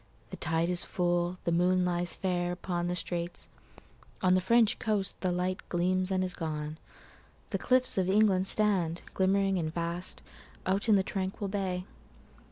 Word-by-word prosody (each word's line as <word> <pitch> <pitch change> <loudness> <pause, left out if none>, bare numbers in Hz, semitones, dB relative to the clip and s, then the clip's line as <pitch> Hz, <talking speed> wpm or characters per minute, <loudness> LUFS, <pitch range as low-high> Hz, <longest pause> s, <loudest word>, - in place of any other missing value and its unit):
The - - -5
tide 165 +1 0
is 180 -1 +1
full, 175 0 0
the 170 - 0
moon 180 +2 +3
lies 175 0 0
fairUpon 175 -1 -1
the 175 - -1
straits;—on 175 +1 -4
the 185 - +3
French 230 +2 +3
coast 210 -4 0
the 185 - +1
lightGleams 185 0 -1
and 185 -1 +1
is 185 -1 -2
gone; 155 -2 -4 0.7
the - - -1
cliffs 255 -5 +3
of 185 0 0
England 195 -2 +3
stand, 190 -6 +1
Glimmering 195 0 +2
and 155 -2 -2
vast, 170 +2 -2 0.4
out 195 +4 0
in 215 - +7
the 195 - +3
tranquil 195 +1 -3
bay. 185 -2 -2
185 Hz, 150 wpm, -30 LUFS, 175-195 Hz, 0.7 s, in